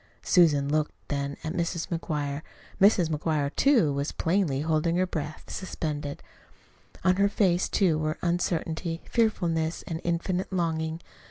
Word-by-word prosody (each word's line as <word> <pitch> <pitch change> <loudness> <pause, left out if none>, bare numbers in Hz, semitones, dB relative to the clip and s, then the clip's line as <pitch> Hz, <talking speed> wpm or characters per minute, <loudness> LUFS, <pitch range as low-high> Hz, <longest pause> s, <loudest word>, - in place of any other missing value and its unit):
Susan 150 -6 +4
looked 150 +1 0 0.2
then 140 -1 -2
at 155 - -3
Mrs. 170 -1 -2
McGuire. 150 -4 -2 0.4
Mrs. 195 -4 +5
McGuire, 150 -2 -1
too, 235 - +4
was 140 +2 -2
plainly 165 -6 0
holding 160 +2 +1
her 185 +1 +2
breath 155 -4 -5
suspended. 150 -6 -4 0.8
On 185 0 +3
her 200 0 +4
face, 185 -4 +2
too, 170 -6 +2
were 155 0 -1
uncertainty, 170 -1 -1
fearfulness, 175 -8 0
and 165 -1 -5
infinite 175 +2 -1
longing. 160 -2 -1
165 Hz, 135 wpm, -27 LUFS, 155-180 Hz, 0.8 s, Mrs